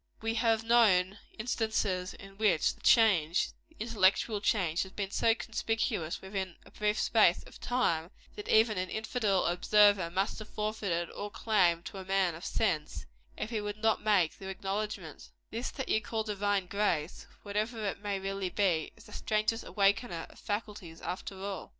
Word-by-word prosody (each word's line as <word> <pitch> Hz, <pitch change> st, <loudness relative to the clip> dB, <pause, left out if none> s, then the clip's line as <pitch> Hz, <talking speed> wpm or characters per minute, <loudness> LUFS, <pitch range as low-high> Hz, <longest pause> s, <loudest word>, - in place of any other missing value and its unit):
We 225 Hz, 0 st, -1 dB
have 225 Hz, -1 st, +2 dB
known 205 Hz, -5 st, +4 dB, 0.2 s
instances 215 Hz, -5 st, -1 dB
in 195 Hz, 0 st, -13 dB
which 195 Hz, -8 st, +3 dB
the -, -, -21 dB
change 185 Hz, -8 st, +4 dB, 0.2 s
the 320 Hz, -, -25 dB
intellectual 210 Hz, -1 st, +2 dB
change 180 Hz, -7 st, +1 dB
has 190 Hz, -, -4 dB
been 195 Hz, -1 st, -4 dB
so 225 Hz, +2 st, +3 dB
conspicuous, 220 Hz, -8 st, -2 dB
within 190 Hz, -2 st, -4 dB
a -, -, -16 dB
brief 210 Hz, +1 st, 0 dB
space 210 Hz, -6 st, +4 dB
of -, -, -14 dB
time, 170 Hz, -10 st, 0 dB, 0.3 s
that 210 Hz, -, -7 dB
even 220 Hz, -3 st, +4 dB
an 185 Hz, 0 st, -2 dB
infidel 220 Hz, -3 st, 0 dB
observer 200 Hz, +1 st, +4 dB
must 195 Hz, +6 st, -1 dB
have 215 Hz, -, -9 dB
forfeited 205 Hz, -5 st, -2 dB
all 205 Hz, -, -5 dB
claim 185 Hz, -6 st, +2 dB
to 195 Hz, -, -7 dB
a -, -, -6 dB
man 190 Hz, -2 st, +1 dB
of 165 Hz, +3 st, -10 dB
sense, 160 Hz, -9 st, -1 dB, 0.3 s
if 215 Hz, -, -4 dB
he 220 Hz, -2 st, -1 dB
would 205 Hz, 0 st, -4 dB
not 220 Hz, 0 st, +1 dB
make 200 Hz, -7 st, +2 dB
the 190 Hz, -, -7 dB
acknowledgment 195 Hz, -3 st, -4 dB, 0.2 s
This 230 Hz, +3 st, -3 dB
that 265 Hz, -, -5 dB
you 220 Hz, -, +2 dB
call 220 Hz, +1 st, -2 dB
divine 205 Hz, -2 st, 0 dB
grace, 180 Hz, -5 st, -1 dB, 0.2 s
whatever 215 Hz, +2 st, -2 dB
it 200 Hz, -, -2 dB
may 200 Hz, -2 st, -2 dB
really 195 Hz, -1 st, -3 dB
be, 180 Hz, -6 st, +1 dB
is -, -, -15 dB
the -, -, -14 dB
strangest 215 Hz, +2 st, 0 dB
awakener 200 Hz, -3 st, +1 dB
of -, -, -17 dB
faculties, 205 Hz, -5 st, -5 dB
after 185 Hz, +2 st, -5 dB
all." 195 Hz, 0 st, -5 dB
205 Hz, 170 wpm, -31 LUFS, 185-220 Hz, 0.3 s, known